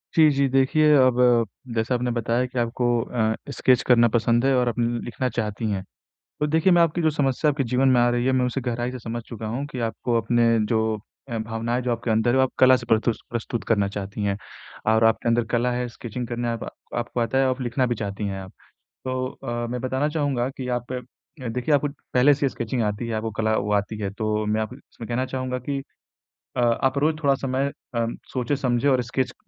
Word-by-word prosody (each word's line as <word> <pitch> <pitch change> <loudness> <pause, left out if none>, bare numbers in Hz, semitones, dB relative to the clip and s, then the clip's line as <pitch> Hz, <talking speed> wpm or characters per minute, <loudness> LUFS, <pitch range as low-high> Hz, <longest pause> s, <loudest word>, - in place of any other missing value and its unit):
जी, 155 -2 +7
जी, 140 0 +2
देखिए 150 +3 +4
अब 130 -2 +4 0.6
जैसा 115 +2 0
आपने 125 0 -1
बताया 120 +1 0
कि 125 0 -4
आपको 120 +1 -1 0.2
अ, 110 -2 0 0.2
स्केच 130 -3 +3
करना 120 -1 +6
पसंद 120 +2 +2
है 135 - +4
और 125 -1 +2
आप 120 - -4
न 120 0 0
लिखना 125 +2 -2
चाहती 110 -2 -3
हैं। 95 -2 -2 0.6
तो 150 - +2
देखिए 160 +5 +3
मैं 175 -1 +6
आपकी 170 +1 +1
जो 160 - +3
समस्या 145 0 +1
आपके 140 -1 -1
जीवन 125 +3 +2
में 125 -2 +5
आ 120 - +4
रही 120 0 0
है, 130 - +3
मैं 130 -1 +2
उसे 125 +2 -2
गहराई 120 0 -2
से 130 - -6
समझ 115 0 -5
चुका 115 -1 -7
हूँ 120 +6 -3
कि 130 - -5
आपको 120 +1 -2
अपने 120 +1 +2 0.2
जो 110 +1 +1 0.5
अ, 115 -2 -3
भावनाएँ 115 +2 -2
जो 125 - -1
आपके 115 0 -3
अंदर 110 +2 +3
हैं, 130 - +2
वो 130 - +5
आप 130 - +1
कला 130 0 +7
से 125 -1 -8
परतूस 110 +1 +2
प्रस्तुत 120 0 -3
करना 100 -3 +2
चाहती 100 +1 -5
हैं 100 -1 0 0.6
और 110 0 +3
आपके 115 +1 +2
अंदर 120 0 +3
कला 120 +1 +2
है, 125 0 -1
स्केचिंग 120 +1 -6
करने 120 0 -2
अप 115 - -5 0.3
आपको 120 0 -2
आता 115 +3 +1
है, 135 - +4
आप 130 0 -1
लिखना 125 +1 0
भी 120 - 0
चाहती 105 -1 -4
हैं 95 -1 -4
आप। 95 0 -10 0.5
तो 130 0 -1 0.2
अ, 120 0 -3
मैं 125 0 -3
बताना 130 +3 0
चाहूँगा 140 -5 0
कि 130 - -4
आप 120 +1 -9 0.6
देखिए 125 +6 0
आपको 145 +1 +1 0.3
पहले 130 +3 +6
से 145 +1 -1
ही 135 - +2
स्केचिंग 120 +1 -3
आती 105 +2 -2
है, 115 - -3
आपको 110 0 -2
कला 110 0 0
वो 105 +1 -1
आती 105 +2 0
है, 100 - -2
तो 105 +1 -1
मैं 105 +1 +1
आप 110 +3 -4
इसमें 125 -3 -12
कहना 125 +2 -1
चाहूँगा 130 -1 -3
कि 140 -1 -1 0.8
अ, - - +2
आप 120 +3 +2
रोज़ 155 +3 +2
थोड़ा 140 -1 +4
समय 135 +1 -1 0.2
अ, 115 0 +1 0.3
सोचें-समझें 130 0 +1
और 130 -2 +3
स्केच, 125 +1 -2
120 Hz, 225 wpm, -24 LUFS, 115-130 Hz, 0.8 s, जी